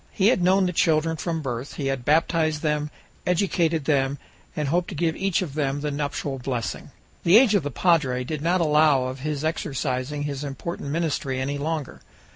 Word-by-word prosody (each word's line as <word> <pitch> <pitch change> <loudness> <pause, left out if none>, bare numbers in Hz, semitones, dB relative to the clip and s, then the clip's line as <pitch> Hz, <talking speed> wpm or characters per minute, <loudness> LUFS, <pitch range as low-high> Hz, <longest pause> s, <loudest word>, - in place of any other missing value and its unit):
He 200 0 +3
had 235 - +2
known 190 +2 +4
the 180 - -1
children 160 -1 +2
from 165 0 -3
birth; 125 0 -4
he 140 - -4
had 135 -2 -1
baptized 155 +1 +2
them, 150 -1 0 0.4
educated 170 -4 +1
them, 140 -2 +1 0.4
and 150 -2 -1
hoped 175 +3 +1
to 185 - -6
give 160 +1 0
each 195 -1 0
of 150 -6 -7
them 145 -1 -1
the 150 0 -2
nuptial 140 -1 -3
blessing. 125 -2 -4 0.3
The 175 +5 +7
age 235 -3 +5
of 200 - +4
the 145 - -3
padre 135 -5 +2
did 150 +3 -4
not 175 +3 +2
allow 150 -3 +4
of 130 +1 -4
his 150 +1 -3
exercising 145 -2 -2
his 145 -1 -4
important 145 +2 -5
ministry 145 -4 -1
any 140 +2 -2
longer. 155 -1 -3
150 Hz, 190 wpm, -24 LUFS, 140-165 Hz, 0.4 s, The